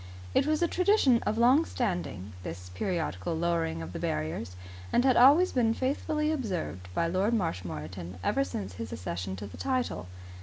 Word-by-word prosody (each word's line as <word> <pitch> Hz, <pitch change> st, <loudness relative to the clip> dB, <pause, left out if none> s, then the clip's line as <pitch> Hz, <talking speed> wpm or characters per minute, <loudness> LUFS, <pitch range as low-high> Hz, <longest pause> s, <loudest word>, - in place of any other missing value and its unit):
It -, -, +3 dB
was 310 Hz, +2 st, +2 dB
a -, -, +4 dB
tradition 360 Hz, -, +4 dB
of 215 Hz, -, 0 dB
long 255 Hz, +7 st, +5 dB
standing, 175 Hz, -, -3 dB
this 90 Hz, 0 st, -7 dB
periodical 160 Hz, -, -2 dB
lowering 165 Hz, -, 0 dB
of 85 Hz, +2 st, -8 dB
the -, -, -4 dB
barriers, 80 Hz, +3 st, -3 dB, 0.4 s
and 245 Hz, -, +3 dB
had 260 Hz, -2 st, +5 dB
always 290 Hz, +9 st, +7 dB
been 230 Hz, -3 st, +2 dB
faithfully 300 Hz, +3 st, 0 dB
observed 185 Hz, -, -3 dB
by 170 Hz, -, +2 dB
Lord 190 Hz, +7 st, +1 dB
Marshmoreton 90 Hz, -, -4 dB
ever 90 Hz, -, +2 dB
since 95 Hz, +1 st, -5 dB
his 110 Hz, +4 st, -6 dB
accession 90 Hz, +1 st, -4 dB
to 100 Hz, +2 st, -7 dB
the 100 Hz, -, -10 dB
title. 255 Hz, -, -1 dB
170 Hz, 165 wpm, -29 LUFS, -, 0.4 s, always